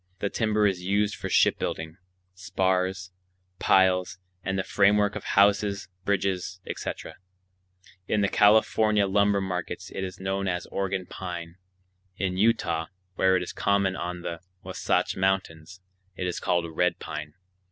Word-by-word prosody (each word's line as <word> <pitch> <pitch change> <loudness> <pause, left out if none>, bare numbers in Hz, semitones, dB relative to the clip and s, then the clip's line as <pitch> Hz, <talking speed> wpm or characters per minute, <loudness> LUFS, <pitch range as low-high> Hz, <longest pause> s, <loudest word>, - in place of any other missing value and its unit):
The 100 0 -2
timber 110 -1 +1
is 95 -3 +1
used 100 +3 +1
for - - -5
shipbuilding, 80 +1 +1 0.4
spars, 95 0 -1 0.5
piles, 90 -1 +3 0.3
and 95 0 -1
the 95 - 0
framework 105 +1 +3
of 105 - -5
houses, 100 -1 +3 0.2
bridges, 95 -2 -1
etc. - - -6 0.9
In 105 - +1
the 100 - +3
California 105 0 +4
lumber 100 +1 +2
markets 90 -2 -4
it 95 - -4
is 95 0 -6
known 95 +1 -2
as 90 -1 -2
"Oregon 95 -1 -2
pine." 85 -2 -7 0.6
In 95 -2 -1
Utah, 90 -6 +1 0.3
where 95 0 +3
it 90 - -2
is - - -7
common 100 -2 +1
on 90 0 -4
the 85 -1 -4 0.2
Wahsatch - - 0
Mountains, 95 -2 -1 0.3
it 90 - -3
is 90 - -2
called 85 -1 +1
"red 90 +1 +2
pine." 75 0 -7
95 Hz, 140 wpm, -26 LUFS, 90-100 Hz, 0.9 s, California